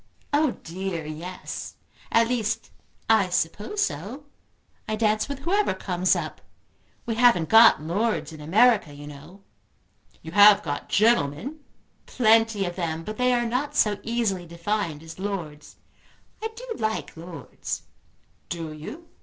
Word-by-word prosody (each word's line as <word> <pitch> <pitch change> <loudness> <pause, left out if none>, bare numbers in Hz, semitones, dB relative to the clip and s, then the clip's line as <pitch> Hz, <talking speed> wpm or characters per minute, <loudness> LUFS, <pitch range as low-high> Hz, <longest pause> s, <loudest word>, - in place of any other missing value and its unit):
"Oh 295 -2 +2
dear 175 -1 -4
yes. 165 +4 -7 0.4
At 230 0 +4
least 230 -2 -2 0.4
I 220 -4 +4
suppose 180 - -1
so. 200 - -4 0.7
I 215 - 0
dance 215 +2 +1
with 280 - -4
whoever 390 - +1
comes 185 -1 +1
up. - - -5 0.6
We 235 - -1
haven't 225 -8 +4
got 225 -7 +7
lords 200 +2 -1
in 155 - -10
America, 200 -1 +3
you 145 0 -10
know!" 150 +7 -12 0.8
"You 160 - -8
have 205 +2 +7
got 145 -3 -4
gentlemen?" 225 - +2 0.5
"Plenty 225 -3 +3
of 175 -1 -4
them; 165 -2 -2
but 215 +4 -6
they 250 0 +3
are 240 -1 +2
not 250 +5 -2
so 210 -2 +2
easily 220 -7 -1
defined 170 -2 -3
as 165 +2 -11
lords. 175 -7 -5 0.7
I 445 - -1
do - - -9
like 220 0 -2
lords." 165 -4 -7 0.7
"Do 165 -2 -5
you?" 295 - -9
205 Hz, 135 wpm, -25 LUFS, 165-230 Hz, 0.8 s, got